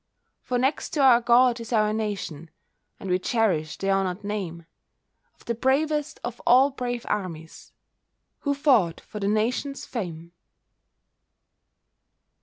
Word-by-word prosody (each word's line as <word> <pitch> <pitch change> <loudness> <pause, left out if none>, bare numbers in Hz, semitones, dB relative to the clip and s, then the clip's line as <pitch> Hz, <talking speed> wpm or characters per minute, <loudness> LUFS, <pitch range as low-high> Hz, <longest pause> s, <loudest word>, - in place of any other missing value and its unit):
For 250 - -2
next 265 +4 0
to 295 - +2
our 245 -3 +6
God 240 +1 +4
is 230 0 -8
our 215 -2 +2
Nation; 195 -8 -4 0.5
And - - -7
we 180 0 +1
cherish 185 -9 0
the 195 0 -1
honoured 195 0 0
name 185 -5 -4 0.7
Of - - -23
the 235 - -1
bravest 295 +5 0
of 240 0 -5
all 265 +3 +5
brave 245 -2 -4
armies 165 -5 -5 0.7
Who 285 -1 -1
fought 250 - +3
for 210 - -9
that 200 - -1
Nation's 240 +6 -1
fame. 170 -7 -6
220 Hz, 130 wpm, -25 LUFS, 185-255 Hz, 0.7 s, our